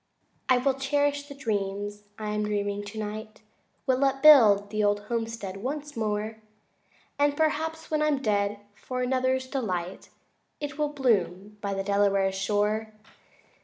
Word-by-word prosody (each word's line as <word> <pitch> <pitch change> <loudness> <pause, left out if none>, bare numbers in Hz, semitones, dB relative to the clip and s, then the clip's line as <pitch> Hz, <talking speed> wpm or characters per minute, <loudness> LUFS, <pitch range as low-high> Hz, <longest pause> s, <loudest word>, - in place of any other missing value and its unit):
V 255 - +6
I - - +3
will 265 +2 +2
cherish 285 +1 0
the 280 - -9
dreams 205 -4 -3
I 215 -1 -4
am 210 0 -1
dreaming 205 -1 -2
tonight, 215 +1 -6 0.4
Will 260 +1 +2
upbuild 265 -8 +6
the 215 0 0
old 205 0 +2
homestead 225 -3 -4
once 290 +6 -5
more, 215 0 -2 0.8
And 290 0 +2
perhaps 320 +1 -1
when 305 -1 +1
I'm 305 -2 +2
dead, 205 -3 0
for 255 +4 -4
another's 260 +1 +1
delight 190 -9 -4 0.5
It 295 +1 -5
will 300 -1 +1
bloom 210 -7 0
by 200 -1 -2
the 195 - -2
Delaware's 200 -1 +2
shore. 210 +2 0
220 Hz, 140 wpm, -27 LUFS, 205-270 Hz, 0.8 s, V